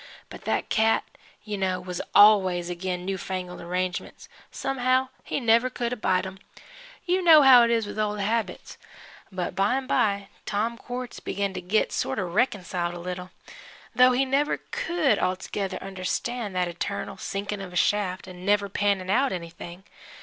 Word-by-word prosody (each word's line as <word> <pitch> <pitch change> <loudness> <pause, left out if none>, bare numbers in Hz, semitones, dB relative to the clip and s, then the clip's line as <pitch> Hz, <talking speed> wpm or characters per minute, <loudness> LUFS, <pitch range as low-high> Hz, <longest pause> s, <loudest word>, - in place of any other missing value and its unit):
But - - -11
that - - -1
cat, 220 0 +3 0.4
you 210 -2 -4
know, 185 -1 0
was 180 -1 -5
always 190 -4 +6
agin 180 0 -4
new 190 0 -2
fangled 180 -1 -5
arrangements 180 +1 -4 0.2
somehow 260 -1 0
he - - -2
never 235 0 +3
could 240 -1 -3
abide 190 -5 0
'em. 190 0 -8 0.7
You 370 +1 +1
know 315 -4 +8
how 260 -2 +9
it 235 - +3
is 230 -2 +1
with 205 - -6
old 210 -1 -1
habits. 220 +3 -2 0.5
But 180 -2 -3
by 195 +6 +2
an' 270 0 -2
by 200 -6 +1 0.2
Tom 220 +3 -1
Quartz 245 0 -7
begin 200 -1 -2
to 185 - -5
git 190 +5 +1
sort - - -2
of 180 -4 -3
reconciled 180 -6 0
a - - -7
little, 180 +1 -6 0.6
though 250 0 +6
he 265 +2 +2
never 275 +3 0
could 345 - +1
altogether 185 +1 -2
understand 195 +3 -3
that 180 -1 +1
eternal 175 +4 -4
sinkin' 200 0 -4
of 190 -2 -7
a - - -11
shaft 185 0 +1
an' 180 -1 -10
never 200 0 +2
pannin' 195 -1 0
out 265 +5 +2
anything. 175 +1 -7
200 Hz, 165 wpm, -26 LUFS, 185-235 Hz, 0.7 s, how